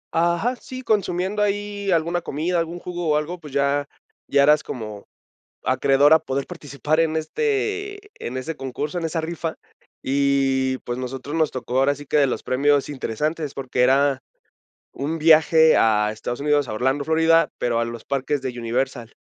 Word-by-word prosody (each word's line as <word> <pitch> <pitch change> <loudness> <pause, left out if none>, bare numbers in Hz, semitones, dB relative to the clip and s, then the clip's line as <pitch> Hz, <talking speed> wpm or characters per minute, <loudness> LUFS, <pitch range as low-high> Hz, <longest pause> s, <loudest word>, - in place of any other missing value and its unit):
Ajá, 170 +9 +1
sí, 255 +1 -9
consumiendo 200 -2 0
ahí 205 -1 -1
alguna 170 +1 +1
comida, 170 +5 -1
algún 165 +1 -3
jugo 175 -2 -4
o 150 - +3
algo, 170 +4 -3
pues, 150 -4 -11
ya 140 +1 0 0.4
ya 140 0 +4
eras 150 +1 +5
como 105 -4 -7 0.6
acreedor 135 +3 +4
a 160 - +6
poder 140 -3 -3
participar 155 -2 -2
en 160 -1 +1
este 415 - -2
en 125 +2 -4
ese 155 +5 -4
concurso, 145 +6 -4
en 165 - -3
esa 165 0 -2
rifa. 165 0 -4 0.5
Y, 135 -1 +1
pues, 120 +1 -3
nosotros 135 +4 -5
nos 160 -2 +2
tocó 130 0 -2
ahora 140 +1 +3
sí 145 - -11
que 150 - 0
de 140 - +4
los 130 - -3
premios 140 +2 +2
interesantes, 150 +3 -3
porque 130 -2 -2
era 135 +1 +3 0.7
un 150 +4 -3
viaje 160 0 +6
a 105 -1 +3
Estados 120 +3 -5
Unidos, 145 -2 +1
a - - -3
Orlando, 130 +5 0
Florida, 160 +1 +3
pero 120 -1 0
a - - 0
los 115 -1 -7
parques 140 +1 -1
de 125 -2 -5
Universal. 120 0 -2
145 Hz, 170 wpm, -22 LUFS, 130-165 Hz, 0.7 s, a